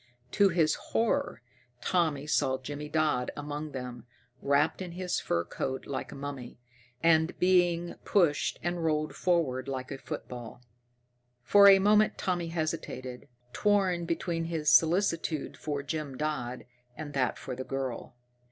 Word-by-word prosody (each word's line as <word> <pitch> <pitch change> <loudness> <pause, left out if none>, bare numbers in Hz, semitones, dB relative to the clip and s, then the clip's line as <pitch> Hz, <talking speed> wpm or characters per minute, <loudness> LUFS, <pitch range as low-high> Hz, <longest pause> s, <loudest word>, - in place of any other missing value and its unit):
To 200 -1 +4
his 165 -3 +2
horror, 235 - -1 0.4
Tommy 155 -5 0
saw 135 -3 +1
Jimmy 145 +3 -7
Dodd 150 -5 +1
among 145 +1 -5
them, 125 -3 -7 0.3
wrapped 140 +6 +2
in 180 -2 -6
his 180 0 -2
fur 85 - -1
coat 130 +8 -4
like 135 - -5
a - - -8
mummy, 140 -4 -7 0.4
and 160 0 +3
being 175 -2 +2
pushed 170 -7 +2
and 175 0 -2
rolled 155 -1 0
forward 145 -8 0
like 130 -1 -4
a 135 - -5
football. 120 -2 -8 0.8
For 200 +9 +7
a 195 - +9
moment 210 +2 +4
Tommy 175 -2 -1
hesitated, 155 -6 -4 0.3
torn 190 -5 +2
between 165 0 -2
his 160 -2 +1
solicitude 165 -2 +2
for 145 -2 -4
Jim 145 -2 -4
Dodd 130 -5 -3 0.3
and 150 -1 -6
that 130 -2 0
for 130 - -6
the 130 - -5
girl. 130 -3 -4
155 Hz, 140 wpm, -29 LUFS, 135-175 Hz, 0.8 s, a